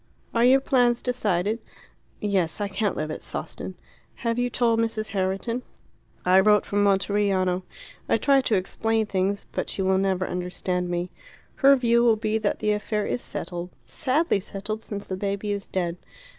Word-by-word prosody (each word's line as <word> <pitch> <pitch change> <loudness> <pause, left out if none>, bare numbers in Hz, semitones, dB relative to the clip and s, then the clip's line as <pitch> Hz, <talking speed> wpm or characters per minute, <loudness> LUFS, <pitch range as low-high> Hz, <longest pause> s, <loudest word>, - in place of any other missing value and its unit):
"Are 230 - +3
your 260 +2 +6
plans 245 -3 +3
decided?" 215 -4 0 0.6
"Yes. 195 -4 0
I 205 - 0
can't 200 +1 -1
live 155 0 -2
at - - -5
Sawston." - - -6 0.5
"Have 230 +1 +1
you 245 0 +1
told 235 -2 +2
Mrs. 225 -1 -1
Herriton?" 195 +5 -1 0.6
"I 185 +1 +6
wrote 210 +1 +4
from 205 0 +1
Monteriano. 195 -2 +2 0.5
I - - +4
tried 275 -2 +3
to 220 - +3
explain 220 +4 0
things; 200 0 -1
but - - -3
she 195 - -2
will 190 0 +3
never 190 -1 +1
understand 180 0 -2
me. 175 +1 -2 0.5
Her 275 0 +7
view 235 -2 +3
will 230 -2 +5
be 220 0 -1
that 210 -2 0
the 210 - 0
affair 210 0 -1
is 245 - -2
settled 175 0 -5 0.2
sadly 285 - +1
settled 205 +3 -5
since 205 -2 -6
the 190 - -4
baby 200 +2 -2
is 200 -1 -3
dead. 175 -2 -2
205 Hz, 170 wpm, -25 LUFS, 190-230 Hz, 0.6 s, Her